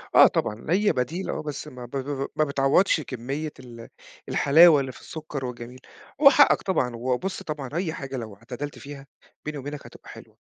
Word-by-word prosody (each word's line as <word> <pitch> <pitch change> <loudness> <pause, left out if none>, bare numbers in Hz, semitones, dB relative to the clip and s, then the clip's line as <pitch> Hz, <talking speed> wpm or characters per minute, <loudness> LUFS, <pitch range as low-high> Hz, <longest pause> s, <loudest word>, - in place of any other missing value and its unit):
آه - - +9
طبعًا 105 +2 -2
هي 205 +5 +3
بديل 160 +9 -3
آه - - -3
بس 150 -1 -6
ما 125 -3 -9
ب - - -14
ب 135 +1 -4
ب - - -4
ما 155 - +3
بتعوضش 140 +5 +2
كمية 140 +4 -5
ال 120 -2 -11 0.4
الحلاوة 155 +1 +6
اللي 135 - -5
في - - -15
السكر 150 -4 -6
وجميل. 125 +1 -8 0.4
هو 275 - +10
حقك 285 +1 +5
طبعًا 125 -11 -1
وبُص 130 +10 -2
طبعًا 150 -4 -5
أي 170 -1 -2
حاجة 135 -3 -6
لو 110 -4 -7
اعتدلت 125 +7 -7
فيها- 140 -1 -10 0.4
بيني 150 -1 -4
وبينك- 145 +1 -7
هتبقى - - -14
حلوة، - - -13
140 Hz, 190 wpm, -25 LUFS, 125-155 Hz, 0.4 s, هو